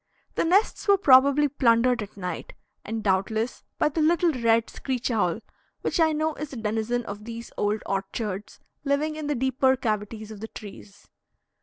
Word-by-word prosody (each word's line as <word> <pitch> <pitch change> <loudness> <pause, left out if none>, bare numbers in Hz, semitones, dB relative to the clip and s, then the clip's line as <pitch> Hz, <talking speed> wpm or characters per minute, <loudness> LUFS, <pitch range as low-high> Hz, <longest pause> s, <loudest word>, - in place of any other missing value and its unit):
The - - 0
nests 390 +7 +2
were 400 0 +6
probably 280 -3 +6
plundered 245 -3 +3
at 205 -1 -8
night, 180 -2 -5 0.3
and 220 0 -4
doubtless 215 +4 0
by - - +2
the 315 +2 -1
little 335 +2 +3
red 230 -4 +2
screech 255 -2 -3
owl, 210 -2 0 0.4
which - - -1
I 320 -1 +5
know 310 +1 0
is 300 -1 -6
a - - -7
denizen 225 +2 -1
of 205 0 -7
these 230 +1 -8
old 205 +1 -1
orchards, 195 +1 -4 0.2
living 295 +2 0
in 310 -1 -5
the 295 - 0
deeper 265 +1 +2
cavities 215 -2 -3
of 215 - -9
the 220 - -6
trees. 200 -2 -12
235 Hz, 170 wpm, -26 LUFS, 215-285 Hz, 0.4 s, were